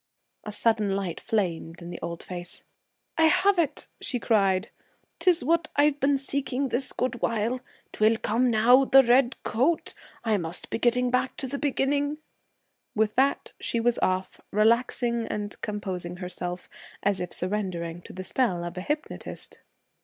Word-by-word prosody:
A 210 - -6
sudden 210 -2 +1
light 190 -4 -3
flamed 175 -6 -2
in 170 0 -8
the 175 - -8
old 170 0 -5
face. 175 -1 -8 0.6
'I 320 - +6
have 385 +4 +4
it!' 310 -3 0 0.2
she 250 - -1
cried. 195 -3 +2 0.5
'Tis 355 -2 +3
what 330 +3 +2
I've 290 0 +3
been 275 0 +3
seeking 275 0 -2
this 255 +2 -1
good 245 -1 -2
while. 230 +2 0 0.3
'Twill 220 +1 +3
come 240 +3 +1
now 240 +4 +6
the 270 0 +7
red 245 +1 +4
coat! 275 +9 +1 0.3
I 220 -2 +2
must 170 -1 -2
be - - -1
getting 245 +1 +2
back 255 +1 0
to 270 - -2
the 275 +2 -4
beginning.' 285 +1 0 0.8
With 215 -1 +2
that, 270 +2 +1
she 235 - -1
was 240 +1 +2
off, 185 0 -1
relaxing 235 +2 +2
and 205 0 -4
composing 185 -4 -4
herself, 180 0 -5 0.4
as 200 -1 +1
if 180 -1 -4
surrendering 180 -3 -3
to - - -12
the 185 - -6
spell 185 -5 0
of 175 +1 -5
a - - -4
hypnotist. 300 - -5
230 Hz, 160 wpm, -27 LUFS, 185-265 Hz, 0.8 s, the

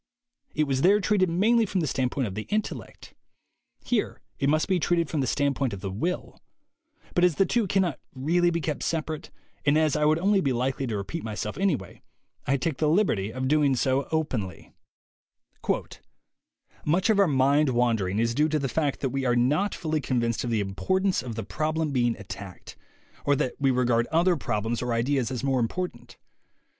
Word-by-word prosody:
It 155 - +2
was 135 -2 0
there 200 +5 +5
treated 195 -2 +2
mainly 220 +6 +3
from 190 - -1
the - - 0
standpoint 130 -1 -1
of 100 - -4
the 110 +2 -5
intellect; 215 0 -4 0.7
here 240 -4 -1 0.2
it 140 - +2
must 155 +1 +2
be 190 -2 +2
treated 170 -1 +1
from 155 - 0
the 130 - -1
standpoint 140 -3 0
of 100 - -7
the 95 -1 -4
will; 170 - -3 0.7
but 175 - +2
as 180 -4 +4
the 195 - +3
two 230 +2 +1
cannot 185 -5 +1 0.2
really 170 +7 +2
be 170 -1 -1
kept 150 -1 -3
separate, 160 -1 -3 0.3
and 145 +1 +3
as 155 -2 +2
I 150 0 +2
would 155 +1 +4
only 195 +3 +2
be 135 -5 +1
likely 130 +2 -1
to 110 -3 -2
repeat 130 +12 -5
myself 105 -1 -4
anyway, 160 - -1 0.5
I 140 - +2
take 155 -1 -2
the 155 +1 +2
liberty 135 - +1
of 130 +2 -3
doing 145 -2 +3
so 130 +2 +1
openly: 125 - -3 2.1
"Much 180 +7 +1
of 205 - +2
our 200 - +5
mind 140 +1 +3
wandering 115 -6 +1
is 115 +1 +1
due 150 +5 +2
to 155 - +1
the 140 -2 -1
fact 145 +1 -1
that 135 - 0
we 135 +1 -2
are 120 -1 +2
not 145 +12 +2
fully 155 -2 -2
convinced 115 -4 0
of 120 - -2
the 110 -3 +1
impor 100 - -1
tance 195 -1 +1
of 120 -3 -6
the 115 - -4
problem 155 0 -1
being 120 -3 +1
attacked, 100 -2 -9 0.5
or 145 - +3
that 130 - -1
we 140 -1 +3
regard 120 -2 +2
other 175 +2 +3
problems 115 -4 -2
or 125 -1 -1
ideas 125 +2 +1
as 125 -1 -4
more 135 -2 +1
important. 180 +10 -4
140 Hz, 195 wpm, -26 LUFS, 120-170 Hz, 2.1 s, there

